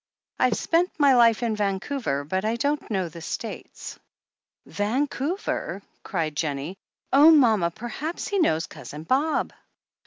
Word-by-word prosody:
"I've -, -, +3 dB
spent 345 Hz, +2 st, +2 dB
my 285 Hz, -2 st, +6 dB
life 235 Hz, -1 st, +5 dB
in 225 Hz, -2 st, 0 dB
Vancouver, 200 Hz, -, -2 dB
but 185 Hz, +6 st, -2 dB
I 220 Hz, +2 st, 0 dB
don't 285 Hz, +4 st, -1 dB
know 190 Hz, -5 st, -1 dB
the 165 Hz, +1 st, -10 dB
States." 225 Hz, +7 st, -7 dB, 0.7 s
"Vancouver!" 270 Hz, -, -2 dB, 0.2 s
cried 160 Hz, -5 st, -3 dB
Jennie. 150 Hz, +3 st, -3 dB, 0.4 s
"Oh, 290 Hz, +4 st, +8 dB
mama, 225 Hz, -, +5 dB
perhaps 240 Hz, -, -5 dB
he 405 Hz, -2 st, 0 dB
knows 165 Hz, -, +2 dB
Cousin 150 Hz, +1 st, -10 dB
Bob!" 280 Hz, -, 0 dB
225 Hz, 130 wpm, -25 LUFS, 175-285 Hz, 0.7 s, Oh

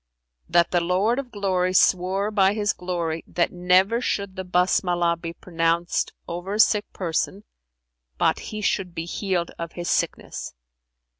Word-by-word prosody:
that 170 Hz, 0 st, +3 dB
the 175 Hz, -, +2 dB
Lord 190 Hz, +8 st, +1 dB
of 270 Hz, -3 st, -5 dB
Glory 185 Hz, -4 st, 0 dB
swore 190 Hz, +3 st, +3 dB
by 200 Hz, -1 st, +3 dB
His 210 Hz, -1 st, +1 dB
glory 170 Hz, -3 st, -3 dB
that 170 Hz, -, 0 dB
never 185 Hz, +6 st, +3 dB
should 200 Hz, -5 st, -2 dB
the 190 Hz, -, -4 dB
Basmalah 180 Hz, -1 st, +2 dB
be 165 Hz, -1 st, -4 dB
pronounced 170 Hz, 0 st, -1 dB, 0.2 s
over 175 Hz, +4 st, -4 dB
a -, -, -3 dB
sick 210 Hz, -1 st, +3 dB
person, 185 Hz, +3 st, -2 dB, 0.7 s
but -, -, +2 dB
he 215 Hz, -1 st, -5 dB
should 190 Hz, -4 st, -1 dB
be 165 Hz, -, -3 dB
healed 180 Hz, -1 st, -2 dB
of 170 Hz, 0 st, -5 dB
his 175 Hz, -1 st, -3 dB
sickness. -, -, -2 dB
180 Hz, 150 wpm, -24 LUFS, 175-200 Hz, 0.7 s, that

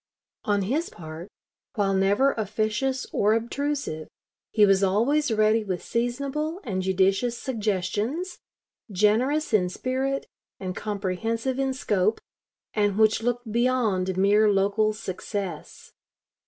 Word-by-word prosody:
On 205 Hz, -1 st, +1 dB
his 285 Hz, -, -1 dB
part, 160 Hz, +1 st, -9 dB, 0.5 s
while 200 Hz, -2 st, +1 dB
never 200 Hz, +8 st, +3 dB
officious 220 Hz, +5 st, -1 dB
or 210 Hz, +2 st, +3 dB
obtrusive, 235 Hz, -, -2 dB, 0.4 s
he 210 Hz, -2 st, +5 dB
was 195 Hz, -1 st, +4 dB
always 240 Hz, +10 st, +2 dB
ready 215 Hz, +1 st, +3 dB
with 185 Hz, -4 st, -3 dB
seasonable 280 Hz, +8 st, -2 dB
and 190 Hz, -7 st, -2 dB
judicious 195 Hz, +6 st, +1 dB
suggestions, 220 Hz, -, -2 dB, 0.5 s
generous 225 Hz, +10 st, +2 dB
in 180 Hz, -4 st, +3 dB
spirit 265 Hz, +6 st, -2 dB, 0.3 s
and 185 Hz, -1 st, -4 dB
comprehensive 225 Hz, +5 st, -2 dB
in 270 Hz, 0 st, +1 dB
scope, 210 Hz, -5 st, 0 dB, 0.5 s
and 205 Hz, -2 st, +1 dB
which 220 Hz, 0 st, +4 dB
looked 245 Hz, -1 st, -2 dB
beyond 220 Hz, -6 st, +1 dB
mere 205 Hz, +3 st, +4 dB
local 205 Hz, +2 st, +2 dB
success. 195 Hz, -4 st, -6 dB
215 Hz, 115 wpm, -25 LUFS, 195-255 Hz, 0.5 s, he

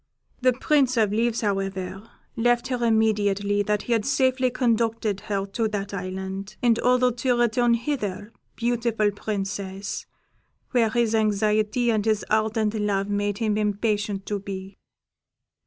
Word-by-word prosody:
The 255 Hz, 0 st, +4 dB
Prince 265 Hz, -1 st, +2 dB
of 215 Hz, -3 st, +3 dB
Leaves, 230 Hz, +1 st, +1 dB
however, 195 Hz, 0 st, -3 dB, 0.3 s
left 240 Hz, +2 st, +1 dB
her 250 Hz, -2 st, -1 dB
immediately 205 Hz, -3 st, +2 dB
that 210 Hz, 0 st, 0 dB
he 240 Hz, -, 0 dB
had 225 Hz, -2 st, +1 dB
safely 260 Hz, 0 st, +2 dB
conducted 230 Hz, -4 st, 0 dB
her 195 Hz, -2 st, -1 dB
to 220 Hz, +3 st, -1 dB
that 205 Hz, -2 st, -4 dB
island, 190 Hz, +1 st, -5 dB
in 235 Hz, -2 st, +5 dB
order 250 Hz, 0 st, +3 dB
to 245 Hz, +1 st, 0 dB
return 240 Hz, 0 st, +3 dB
hither, 230 Hz, -5 st, -3 dB, 0.2 s
beautiful 230 Hz, -3 st, +1 dB
Princess, 195 Hz, -1 st, -4 dB, 0.6 s
where 235 Hz, -3 st, +3 dB
his 230 Hz, 0 st, +1 dB
anxiety 215 Hz, +2 st, +2 dB
and 215 Hz, -2 st, +1 dB
his 215 Hz, -1 st, 0 dB
ardent 215 Hz, 0 st, +1 dB
love 205 Hz, -2 st, -1 dB
made 205 Hz, 0 st, -1 dB
him 215 Hz, -2 st, 0 dB
impatient 210 Hz, -1 st, -1 dB
to 205 Hz, -1 st, -2 dB
be." 195 Hz, 0 st, -7 dB
215 Hz, 140 wpm, -25 LUFS, 200-235 Hz, 0.6 s, in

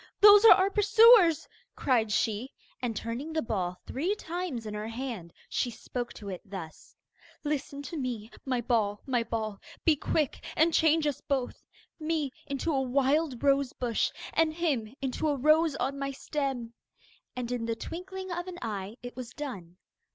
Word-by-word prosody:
'Those 415 Hz, 0 st, +9 dB
are -, -, +12 dB
our 380 Hz, +1 st, +2 dB
pursuers,' 415 Hz, -5 st, +6 dB, 0.3 s
cried 230 Hz, -5 st, +1 dB
she, 220 Hz, +3 st, 0 dB, 0.3 s
and 240 Hz, -3 st, -2 dB
turning 235 Hz, +9 st, -4 dB
the 315 Hz, -, +1 dB
ball 180 Hz, -5 st, -2 dB
three 345 Hz, +10 st, -1 dB
times 340 Hz, -, -4 dB
in 210 Hz, -, -5 dB
her 210 Hz, +1 st, -4 dB
hand 230 Hz, -7 st, -5 dB, 0.2 s
she 245 Hz, -, -1 dB
spoke 240 Hz, +1 st, -5 dB
to 205 Hz, -, -10 dB
it 185 Hz, -3 st, -5 dB
thus: 185 Hz, -5 st, -9 dB, 0.5 s
'Listen 285 Hz, -1 st, -3 dB
to 285 Hz, -, -7 dB
me, 240 Hz, -5 st, -4 dB
my 255 Hz, -3 st, -1 dB
ball, 215 Hz, -4 st, 0 dB
my 250 Hz, -3 st, +1 dB
ball. 220 Hz, -3 st, -3 dB, 0.3 s
Be 320 Hz, -, +5 dB
quick 295 Hz, 0 st, -1 dB
and 325 Hz, +1 st, +4 dB
change 320 Hz, -1 st, +4 dB
us 290 Hz, -3 st, -1 dB
both. 265 Hz, -3 st, -3 dB, 0.3 s
Me 310 Hz, -3 st, -1 dB, 0.2 s
into 280 Hz, +4 st, -1 dB
a 270 Hz, -, +2 dB
wild 270 Hz, +1 st, +1 dB
rose 275 Hz, -2 st, +3 dB
bush, 235 Hz, -3 st, 0 dB, 0.2 s
And 320 Hz, -1 st, +2 dB
him 280 Hz, -11 st, 0 dB
into 270 Hz, +4 st, -1 dB
a 290 Hz, -2 st, +1 dB
rose 310 Hz, +2 st, +4 dB
on 275 Hz, +1 st, -2 dB
my 275 Hz, 0 st, -2 dB
stem.' 270 Hz, -5 st, -3 dB, 0.6 s
And 250 Hz, -1 st, -4 dB
in 245 Hz, -2 st, -2 dB
the 230 Hz, -, 0 dB
twinkling 375 Hz, +7 st, -6 dB
of 350 Hz, +1 st, -3 dB
an 360 Hz, -1 st, -7 dB
eye 205 Hz, -2 st, -4 dB
it 245 Hz, -, -7 dB
was 250 Hz, -2 st, -6 dB
done. 195 Hz, -, -7 dB
265 Hz, 170 wpm, -29 LUFS, 230-315 Hz, 0.6 s, are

